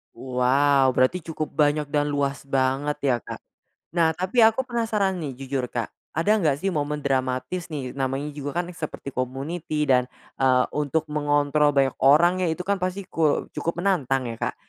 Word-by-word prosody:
Wow, 130 Hz, +2 st, +2 dB
berarti 130 Hz, +8 st, +3 dB
cukup 155 Hz, -2 st, -5 dB
banyak 150 Hz, -1 st, +1 dB
dan 145 Hz, -1 st, +1 dB
luas 140 Hz, -1 st, -2 dB
banget 135 Hz, +2 st, 0 dB
ya, 135 Hz, -3 st, +3 dB
Kak? -, -, -8 dB, 0.6 s
Nah, 165 Hz, -2 st, +4 dB
tapi 185 Hz, +8 st, +1 dB
aku 225 Hz, +4 st, +4 dB
penasaran 220 Hz, -5 st, 0 dB
nih 135 Hz, -4 st, -6 dB
jujur 135 Hz, -2 st, -3 dB
Kak, 115 Hz, -3 st, -2 dB, 0.2 s
ada 165 Hz, +6 st, 0 dB
nggak 155 Hz, -10 st, +1 dB
sih 190 Hz, -, 0 dB
momen 150 Hz, 0 st, -1 dB
dramatis 135 Hz, +6 st, -2 dB
nih, 135 Hz, -5 st, -5 dB
namanya 135 Hz, +2 st, -2 dB
juga 145 Hz, +2 st, -4 dB
kan 175 Hz, -, -1 dB
seperti 150 Hz, -4 st, -6 dB
community 150 Hz, +4 st, -2 dB
dan, 125 Hz, -1 st, +2 dB, 0.2 s
eee, 130 Hz, -1 st, +3 dB
untuk 150 Hz, +2 st, 0 dB
mengontrol 145 Hz, 0 st, +2 dB
banyak 135 Hz, -2 st, +2 dB
orang 175 Hz, +7 st, +5 dB
ya, 170 Hz, -, +1 dB
itu 180 Hz, +3 st, -4 dB
kan 200 Hz, -, +2 dB
pasti 185 Hz, +1 st, -2 dB
ku 155 Hz, -5 st, +1 dB
cukup 170 Hz, 0 st, -3 dB
menantang 140 Hz, -9 st, +1 dB
ya, 115 Hz, -, -4 dB, 0.2 s
Kak. -, -, -24 dB
145 Hz, 170 wpm, -24 LUFS, 135-170 Hz, 0.6 s, orang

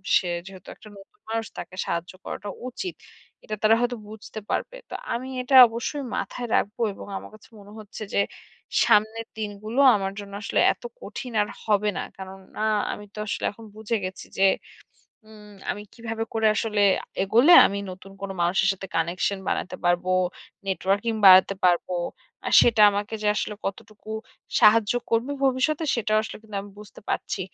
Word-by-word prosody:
"সে 180 Hz, -, +3 dB, 0.2 s
যেহেতু 190 Hz, -1 st, -12 dB
একটা -, -, -16 dB
নতুন 380 Hz, -, -17 dB
মানুষ 225 Hz, 0 st, -1 dB
তাকে 185 Hz, -, -7 dB
সাহায্য 170 Hz, +1 st, -3 dB
করাটা 205 Hz, -, -6 dB, 0.2 s
উচিত।" 365 Hz, +8 st, -5 dB, 0.5 s
এটা 215 Hz, -, -4 dB
তারা 220 Hz, +1 st, +6 dB
হয়তো 245 Hz, 0 st, 0 dB
বুঝতে 220 Hz, 0 st, -9 dB
পারবে। -, -, -2 dB
তো -, -, -9 dB, 0.2 s
আমি 245 Hz, +2 st, -3 dB
এটা 250 Hz, +2 st, +1 dB
অবশ্যই 235 Hz, +5 st, -4 dB
মাথায় 245 Hz, -1 st, -4 dB
রাখব 205 Hz, -, 0 dB, 0.2 s
এবং -, -, -10 dB
আমার -, -, -9 dB
কাছে 215 Hz, -, -19 dB
মনে 200 Hz, +1 st, -14 dB
হচ্ছে 215 Hz, 0 st, -8 dB
যে -, -, +2 dB, 0.6 s
সামনের 220 Hz, +2 st, +2 dB
দিনগুলো 215 Hz, +3 st, -4 dB, 0.2 s
আমার 195 Hz, -1 st, -2 dB
জন্য 200 Hz, -1 st, -9 dB
আসলে 220 Hz, -, 0 dB
এত -, -, -25 dB, 0.2 s
কঠিন 255 Hz, -, -7 dB
আর 210 Hz, -, 0 dB, 0.2 s
হবে 210 Hz, -1 st, +2 dB
না। -, -, -1 dB, 0.2 s
কারণ 190 Hz, 0 st, -9 dB, 0.2 s
আ -, -, +2 dB, 0.3 s
আমি 210 Hz, -, -9 dB
তো -, -, -16 dB
আসলে -, -, -3 dB
এখন 225 Hz, +2 st, -14 dB
বুঝে 220 Hz, +1 st, -2 dB
গেছি 185 Hz, 0 st, -7 dB
যে 195 Hz, -, +4 dB, 0.8 s
উম 210 Hz, -1 st, -14 dB, 0.2 s
আমি 205 Hz, -, -4 dB
কিভাবে 225 Hz, -1 st, -4 dB
করে 220 Hz, 0 st, +2 dB
আসলে 210 Hz, -1 st, 0 dB, 0.2 s
আ -, -, -11 dB, 0.2 s
এগোলে 235 Hz, -, +5 dB
আমি 200 Hz, -, -3 dB
নতুন 190 Hz, +1 st, -11 dB
কোনো 195 Hz, -1 st, -4 dB
মানুষের 190 Hz, +3 st, +2 dB
সাথে 195 Hz, 0 st, -8 dB
কানেকশন 175 Hz, +4 st, 0 dB
বানাতে -, -, -2 dB
পারবো, 175 Hz, +1 st, +1 dB, 0.6 s
নেটওয়ার্কিং 195 Hz, +4 st, 0 dB
বাড়াতে 190 Hz, +1 st, +8 dB
পারব। 175 Hz, -1 st, +3 dB, 0.6 s
আর -, -, -2 dB
সেটা 225 Hz, -3 st, +4 dB
আমাকে 205 Hz, +2 st, -3 dB
যে -, -, -1 dB
আসলে 210 Hz, -, -2 dB
কতটুকু 215 Hz, +2 st, -7 dB, 0.5 s
সাহায্য 210 Hz, -1 st, +6 dB, 0.2 s
করবে 230 Hz, +5 st, +1 dB
ভবিষ্যতে 270 Hz, +5 st, +1 dB
সেটাও 215 Hz, -1 st, +1 dB
আসলে -, -, -7 dB
কিন্তু 215 Hz, -2 st, -8 dB
আমি 205 Hz, -, -12 dB
বুঝতে 210 Hz, 0 st, -13 dB
পারছি। -, -, -2 dB
210 Hz, 170 wpm, -25 LUFS, 195-225 Hz, 0.8 s, বাড়াতে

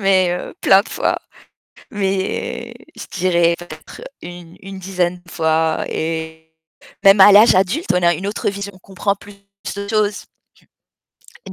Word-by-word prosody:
mais, 190 Hz, -2 st, +3 dB
heu, -, -, -9 dB
plein 195 Hz, +1 st, +5 dB
de -, -, -13 dB
fois, -, -, -1 dB, 0.7 s
mais 195 Hz, -3 st, -3 dB, 0.2 s
je -, -, -8 dB
dirais 170 Hz, -2 st, +2 dB
peut-être 155 Hz, -3 st, -11 dB, 0.2 s
une 175 Hz, -1 st, -11 dB
une 195 Hz, 0 st, -9 dB
dizaine 180 Hz, -1 st, -2 dB
fois 160 Hz, -1 st, 0 dB
et 160 Hz, 0 st, -5 dB, 0.5 s
même 195 Hz, +1 st, +7 dB
à 205 Hz, -, +9 dB
l'âge 210 Hz, +1 st, +7 dB
adulte, 195 Hz, -, +1 dB
on 180 Hz, -, +1 dB
a 170 Hz, 0 st, +4 dB
une 190 Hz, +5 st, -5 dB
autre 205 Hz, -, -2 dB
vision, 200 Hz, 0 st, -6 dB
on 185 Hz, -, -17 dB
comprend 200 Hz, +1 st, -2 dB
plus 205 Hz, +1 st, -14 dB, 0.4 s
de 200 Hz, 0 st, -5 dB
choses. 210 Hz, -1 st, -1 dB, 1.2 s
Je -, -, -8 dB
185 Hz, 150 wpm, -18 LUFS, 170-200 Hz, 1.2 s, à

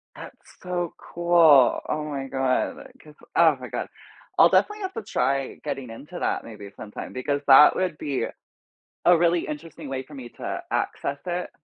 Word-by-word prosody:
That's -, -, -10 dB, 0.3 s
so 175 Hz, -2 st, -3 dB
cool, 165 Hz, -6 st, +4 dB
oh 150 Hz, 0 st, -2 dB
my 140 Hz, -3 st, -4 dB
god, 130 Hz, -1 st, 0 dB, 0.3 s
'cause 150 Hz, -1 st, -16 dB, 0.2 s
oh -, -, +5 dB
my -, -, -7 dB
god. -, -, -4 dB, 0.5 s
I'll -, -, +8 dB
definitely 420 Hz, 0 st, +2 dB
have 380 Hz, 0 st, -4 dB
to -, -, -5 dB
try 135 Hz, +1 st, -1 dB
getting 135 Hz, -4 st, -4 dB
into 150 Hz, +10 st, -9 dB
that -, -, -1 dB
maybe 105 Hz, -3 st, -10 dB
sometime 105 Hz, -1 st, -8 dB
because 140 Hz, +3 st, -2 dB
that 140 Hz, +2 st, +8 dB
would 180 Hz, -4 st, -1 dB
be 140 Hz, -4 st, -2 dB, 0.8 s
a 175 Hz, -1 st, +7 dB
really 170 Hz, 0 st, +2 dB
interesting 150 Hz, 0 st, -8 dB
way 130 Hz, -1 st, -3 dB
for 150 Hz, -, -16 dB
me 130 Hz, -4 st, -9 dB
to -, -, -6 dB
access 140 Hz, 0 st, -2 dB
it. 180 Hz, 0 st, -3 dB
145 Hz, 170 wpm, -24 LUFS, 135-170 Hz, 0.8 s, I'll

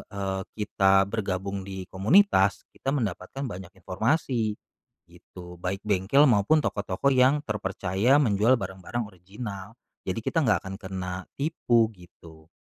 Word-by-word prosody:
eee, 95 Hz, -1 st, -3 dB
kita 95 Hz, -2 st, +3 dB
bergabung 100 Hz, -2 st, -3 dB
di 95 Hz, -1 st, -6 dB
komunitas, 100 Hz, -, +3 dB
kita -, -, -8 dB
mendapatkan 110 Hz, +3 st, -4 dB
banyak 95 Hz, -7 st, -6 dB
informasi 110 Hz, -, -1 dB, 0.5 s
gitu, 90 Hz, -1 st, -13 dB
baik 95 Hz, +2 st, -3 dB
bengkel 105 Hz, +8 st, +3 dB
maupun 120 Hz, +7 st, +4 dB
toko-toko 100 Hz, +5 st, -1 dB
yang 130 Hz, +3 st, +4 dB
terpercaya 100 Hz, +3 st, +1 dB
menjual 115 Hz, +1 st, +3 dB
barang-barang 95 Hz, +4 st, -5 dB
original. 100 Hz, +3 st, -8 dB, 0.3 s
Jadi -, -, -2 dB
kita -, -, +1 dB
nggak -, -, +2 dB
akan 95 Hz, 0 st, -6 dB
kena 95 Hz, -2 st, -5 dB, 0.2 s
tipu, 120 Hz, -6 st, +2 dB
gitu. 80 Hz, -3 st, -17 dB
100 Hz, 125 wpm, -26 LUFS, 95-120 Hz, 0.5 s, maupun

